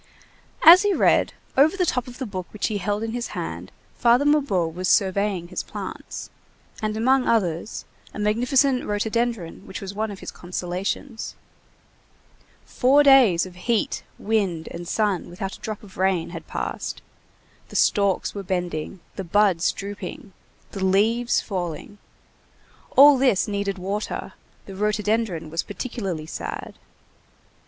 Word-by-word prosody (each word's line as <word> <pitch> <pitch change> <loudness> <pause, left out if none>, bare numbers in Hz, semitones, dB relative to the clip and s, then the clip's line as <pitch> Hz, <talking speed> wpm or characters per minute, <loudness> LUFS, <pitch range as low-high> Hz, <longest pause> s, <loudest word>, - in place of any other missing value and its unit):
As 340 +3 +10
he 410 -2 +2
read, - - +3 0.2
over 305 +8 +4
the 365 - +2
top 250 -7 -1
of 250 0 -10
the 260 - -4
book 185 -5 -5
which 210 - -2
he 210 -2 -2
held 205 +3 -1
in 225 - -3
his 240 0 -3
hand, - - -5 0.3
Father 240 +4 +4
Mabeuf 255 - +2
was 185 +2 -2
surveying 195 -2 +1
his - - -3
plants, - - -7 0.5
and 215 0 -2
among 260 +3 +3
others 185 -4 0 0.3
a - - -10
magnificent 250 +5 +2
rhododendron 215 -3 -2
which 190 - -6
was 195 0 -6
one 215 +2 -2
of 200 - -7
his - - -7
consolations; 185 +7 -4 1.3
four 275 +4 +4
days 255 -12 +6
of 185 - -10
heat, 215 +5 -1 0.2
wind, 195 -7 -1
and 175 0 -7
sun 205 -4 0
without 190 +2 -5
a - - -16
drop 215 -1 -6
of 195 -2 -14
rain, 185 -2 +1
had - - -8
passed; - - -4 0.7
the - - -11
stalks 200 -3 +2
were 200 - -5
bending, 180 -2 -3 0.2
the 195 - -3
buds 190 -1 +3
drooping, 200 -1 -7 0.4
the 195 - -4
leaves 220 +6 +2
falling; 180 0 -5 1.0
all 280 0 +9
this 250 -6 +3
needed 200 -1 -2
water, 200 +3 -4 0.3
the 195 - -9
rhododendron 210 -4 -1
was 165 - 0
particularly 195 -6 -5
sad. - - -6
205 Hz, 145 wpm, -24 LUFS, 185-235 Hz, 1.3 s, As